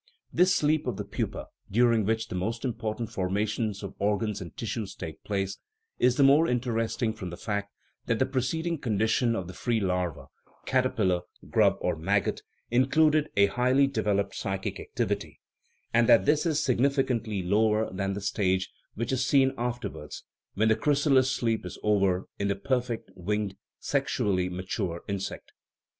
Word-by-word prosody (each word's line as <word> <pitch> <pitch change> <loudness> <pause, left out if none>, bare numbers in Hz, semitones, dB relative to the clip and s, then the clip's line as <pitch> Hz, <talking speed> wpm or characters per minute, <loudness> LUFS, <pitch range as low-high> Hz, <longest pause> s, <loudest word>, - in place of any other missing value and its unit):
This 185 +1 +4
sleep 155 +1 +1
of - - -2
the - - -4
pupa, - - -4 0.2
during 115 -1 +3
which 110 +1 0
the - - -5
most 110 +8 -2
important 115 -2 -3
forma 95 +3 0
tions 105 -2 -3
of 100 - -6
organs 105 0 0
and 85 - -9
tissues 110 -2 -4
take 80 - -8
place, 95 -2 -2 0.4
is 125 0 +4
the 140 - +4
more 145 +4 +6
in 125 0 +2
teresting 115 -1 -1
from 95 -5 -6
the 85 - -7
fact 100 0 -3 0.4
that 115 - +2
the 130 - +2
preceding 155 +6 -1
condition 110 +1 +1
of 95 - -3
the 90 - -8
free 120 +2 0
larva 90 -5 -1 0.4
(caterpillar, 110 -9 +1 0.3
grub, - - +4
or - - 0
maggot) - - 0 0.3
included 150 +5 +3
a 100 - +7
highly 125 +6 +3
developed 105 -6 0
psychic 95 0 -3
activity, - - -3 0.5
and 115 0 +4
that 115 - +6
this 150 +3 +3
is, 155 -1 +1
significantly, 125 -6 +1
lower 110 +3 +2
than 95 +1 -1
the 100 - -4
stage 95 -1 0 0.2
which 115 +3 -2
is 130 -1 +1
seen 135 0 +4
after 120 0 -2
wards - - -9 0.3
(when 110 +3 +3
the 110 - +5
chrysalis 140 0 +3
sleep 115 -3 0
is 90 - -7
over) 100 -3 +2
in 100 - 0
the 100 - +1
perfect, 125 +1 -2
winged, 105 +2 -2 0.2
sexually 90 -3 0
mature 90 -1 -3
insect. 100 -1 -5
110 Hz, 165 wpm, -28 LUFS, 100-130 Hz, 0.5 s, a